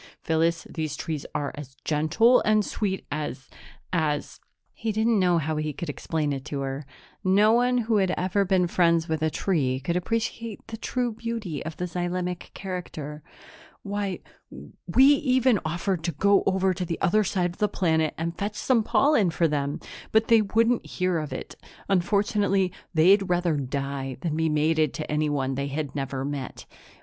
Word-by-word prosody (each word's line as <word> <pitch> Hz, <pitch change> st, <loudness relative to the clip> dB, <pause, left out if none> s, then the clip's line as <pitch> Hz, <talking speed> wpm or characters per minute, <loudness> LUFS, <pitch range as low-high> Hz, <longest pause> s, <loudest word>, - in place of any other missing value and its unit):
"Phyllis, 165 Hz, +1 st, +1 dB
these 155 Hz, -3 st, -4 dB
trees 150 Hz, -1 st, -4 dB
are 145 Hz, -1 st, -1 dB
as 140 Hz, -3 st, -10 dB
gentle 165 Hz, +12 st, +4 dB
and 215 Hz, -1 st, +3 dB
sweet 195 Hz, -3 st, -2 dB
as 145 Hz, -3 st, -4 dB, 0.4 s
as 150 Hz, -4 st, -1 dB, 0.2 s
" -, -, -57 dB
He 225 Hz, -1 st, -3 dB
didn't 220 Hz, +1 st, +2 dB
know 180 Hz, -2 st, +3 dB
how 155 Hz, 0 st, -1 dB
he 155 Hz, 0 st, -2 dB
could 160 Hz, +1 st, -4 dB
explain 150 Hz, 0 st, -2 dB
it 135 Hz, -1 st, -5 dB
to 140 Hz, -2 st, -4 dB
her. 135 Hz, +1 st, -4 dB, 0.4 s
No 200 Hz, +3 st, +5 dB
one 245 Hz, +2 st, +3 dB
who 225 Hz, -2 st, +1 dB
had 190 Hz, -2 st, +2 dB
never 190 Hz, +2 st, +1 dB
been 185 Hz, -1 st, +2 dB
friends 170 Hz, -1 st, +2 dB
with 160 Hz, -1 st, -1 dB
a 160 Hz, -, +2 dB
tree 140 Hz, -8 st, 0 dB
could 155 Hz, +6 st, -2 dB
appreciate 225 Hz, +3 st, -3 dB
the 225 Hz, -, -5 dB
true 245 Hz, +1 st, -1 dB
beauty 220 Hz, -9 st, -4 dB
of 160 Hz, 0 st, -6 dB
the 180 Hz, -, -2 dB
xylemic 180 Hz, 0 st, -3 dB
character. 160 Hz, -6 st, -6 dB, 0.6 s
"Why, 200 Hz, -2 st, -3 dB, 0.7 s
we 235 Hz, +10 st, +5 dB
even 260 Hz, -5 st, +4 dB
offered 175 Hz, +2 st, -2 dB
to 170 Hz, -, -1 dB
go 200 Hz, +7 st, +4 dB
over 190 Hz, 0 st, +2 dB
to 180 Hz, +1 st, -3 dB
the 165 Hz, -1 st, -3 dB
other 215 Hz, +3 st, +3 dB
side 180 Hz, -2 st, 0 dB
of 175 Hz, -, -15 dB
the 210 Hz, -, +2 dB
planet 160 Hz, -4 st, +1 dB
and 165 Hz, +1 st, -3 dB
fetch 205 Hz, +2 st, -3 dB
some 250 Hz, -4 st, +2 dB
pollen 230 Hz, -, +3 dB
for 165 Hz, 0 st, +2 dB
them, 145 Hz, -1 st, -2 dB, 0.3 s
but 220 Hz, 0 st, +3 dB
they 230 Hz, -1 st, +7 dB
wouldn't 225 Hz, +3 st, +2 dB
hear 180 Hz, -2 st, -1 dB
of 155 Hz, -2 st, -5 dB
it. -, -, -6 dB, 0.4 s
Unfortunately, 195 Hz, 0 st, +2 dB, 0.2 s
they'd 190 Hz, +4 st, +4 dB
rather 175 Hz, -2 st, +2 dB
die 135 Hz, -1 st, -3 dB
than 160 Hz, -3 st, -1 dB
be 160 Hz, 0 st, +1 dB
mated 155 Hz, +1 st, +2 dB
to 155 Hz, -, -5 dB
anyone 145 Hz, -3 st, 0 dB
they 140 Hz, +1 st, -2 dB
had 145 Hz, 0 st, -4 dB
never 135 Hz, -1 st, -3 dB
met." 140 Hz, -2 st, -5 dB
175 Hz, 175 wpm, -26 LUFS, 150-205 Hz, 0.7 s, they